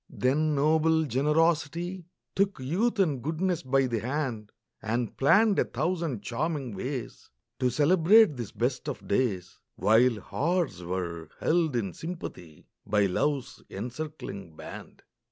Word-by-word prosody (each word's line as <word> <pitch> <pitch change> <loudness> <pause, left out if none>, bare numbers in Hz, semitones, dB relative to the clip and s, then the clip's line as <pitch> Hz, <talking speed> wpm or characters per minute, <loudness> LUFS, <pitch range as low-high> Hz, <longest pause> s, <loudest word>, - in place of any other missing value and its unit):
Then 150 +4 +1
noble 160 +2 +3
generosity 165 +5 0 0.3
Took 195 -4 +1
youth 190 - 0
and 155 -10 +1
goodness 165 +5 -1
by 135 +1 +2
the 120 -3 -1
hand, 125 -4 -3 0.3
And 115 +1 -2
planned 205 +9 +4
a - - +5
thousand 155 - -2
charming 135 0 -2
ways 125 +4 -5 0.3
To 125 -1 +2
celebrate 165 - +5
this 120 -4 -6
best 130 +4 -2
of 135 - -7
days, 100 -5 -1 0.2
While 115 +1 +4
hearts 155 - -1
were 85 -3 -4
held 160 -4 +1
in 100 -7 -1
sympathy 90 - -8 0.2
By 105 -1 +2
love's 135 +8 -1
encircling 115 - -6
band. - - -10
140 Hz, 125 wpm, -28 LUFS, 115-160 Hz, 0.3 s, a